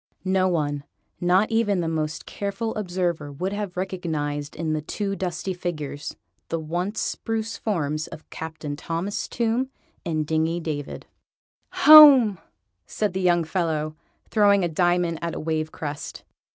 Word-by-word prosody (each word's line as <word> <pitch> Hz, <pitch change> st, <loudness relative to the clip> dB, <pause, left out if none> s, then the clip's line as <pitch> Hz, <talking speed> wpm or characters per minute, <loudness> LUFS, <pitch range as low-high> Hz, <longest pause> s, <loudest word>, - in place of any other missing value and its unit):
No 185 Hz, 0 st, +2 dB
one, 145 Hz, -5 st, -1 dB, 0.4 s
not 185 Hz, +5 st, +3 dB
even 215 Hz, -4 st, +2 dB
the 170 Hz, -, -1 dB
most 155 Hz, -1 st, -2 dB
careful 200 Hz, +3 st, -3 dB
observer, 175 Hz, -6 st, -2 dB
would 185 Hz, +8 st, -3 dB
have 205 Hz, -3 st, -4 dB
recognised 155 Hz, -6 st, -3 dB
in 155 Hz, -1 st, -2 dB
the 155 Hz, -, -1 dB
two 195 Hz, +5 st, -3 dB
dusty 185 Hz, 0 st, -3 dB
figures, 155 Hz, -5 st, -5 dB, 0.3 s
the 165 Hz, -, -1 dB
once 175 Hz, +7 st, -3 dB
spruce 225 Hz, 0 st, -2 dB
forms 155 Hz, -7 st, -2 dB
of 155 Hz, -, -11 dB
Captain 160 Hz, -2 st, -6 dB
Thomas 165 Hz, +6 st, -3 dB
Tomb 235 Hz, +3 st, 0 dB, 0.3 s
and 155 Hz, -3 st, -1 dB
Dingy 160 Hz, +2 st, 0 dB
David. 150 Hz, -4 st, -5 dB, 0.8 s
"Home!" 280 Hz, -, +10 dB, 0.5 s
said 210 Hz, -3 st, -1 dB
the 190 Hz, -, -2 dB
young 175 Hz, -2 st, +3 dB
fellow, 160 Hz, -3 st, -1 dB, 0.3 s
throwing 200 Hz, -3 st, +4 dB
a -, -, +2 dB
diamond 175 Hz, 0 st, +1 dB
at 170 Hz, -1 st, -3 dB
a -, -, -4 dB
wave 155 Hz, 0 st, -2 dB
crest. 145 Hz, -2 st, -6 dB
175 Hz, 140 wpm, -24 LUFS, 155-195 Hz, 0.8 s, Home